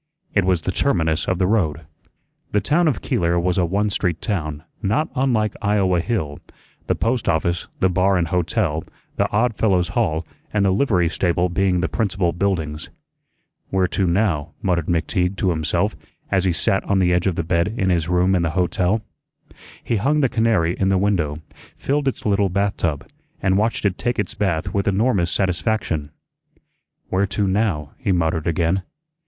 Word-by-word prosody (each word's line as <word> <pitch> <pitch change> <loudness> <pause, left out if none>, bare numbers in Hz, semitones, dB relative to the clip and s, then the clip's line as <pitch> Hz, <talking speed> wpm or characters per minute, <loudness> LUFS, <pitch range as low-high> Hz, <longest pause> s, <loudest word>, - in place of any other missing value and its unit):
It 100 -3 +2
was 90 -3 +1
the 95 - -1
terminus 80 - +1
of 95 - +1
the 90 - +2
road. 90 -7 +1 0.7
The 105 - +4
town 165 +9 +2
of 110 - 0
Keeler 85 0 +1
was 90 +2 0
a 90 - +3
one 100 +4 0
street 90 -5 -1
town, 75 -8 -3 0.2
not 115 +10 0
unlike 120 -6 +1
Iowa 100 -4 +2
Hill 80 -7 -2 0.5
the - - +2
post 120 +1 0
office, 85 +2 0
the 95 - +5
bar 95 +1 +2
and 85 -3 0
hotel, 80 -3 0 0.3
the - - +1
Odd 115 +3 +1
Fellows' 95 -5 +2
Hall, 80 +1 0 0.3
and 100 -2 +2
the 95 - +3
livery 95 -5 +2
stable 90 +1 0
being 90 0 +1
the 90 - +1
principal 95 -5 0
buildings. 80 -5 -2 0.8
"Where 95 -1 +2
to 95 - 0
now?" 85 -4 0
muttered 85 -4 0
McTeague 90 +2 0
to 95 -1 +1
himself 80 -2 0 0.4
as 95 -1 +2
he 95 - +3
sat 95 +3 +1
on 100 - +1
the 90 -2 +3
edge 90 +2 +1
of 95 - 0
the 85 - -1
bed 85 +1 +1
in 95 -1 +1
his 85 -1 0
room 90 +1 +3
in 90 - +2
the 85 - +1
hotel. 90 +4 +1 0.8
He 115 - 0
hung 145 +9 +2
the 135 - +3
canary 110 -8 +2
in 95 - +2
the 95 - +3
window, 85 -6 0 0.4
filled 145 0 -1
its 135 - -2
little 100 -1 +2
bathtub, 90 -6 -1 0.3
and 95 0 +1
watched 110 +2 0
it 95 -2 0
take 120 0 -1
its 105 - -2
bath 85 -6 -1
with 100 -1 0
enormous 100 -3 +2
satisfaction. 85 -5 -1 1.0
"Where 95 +2 +1
to 100 +2 -1
now?" 95 -7 0
he 115 -7 0
muttered 80 -2 0
again. 85 +3 +1
95 Hz, 180 wpm, -21 LUFS, 85-100 Hz, 1.0 s, the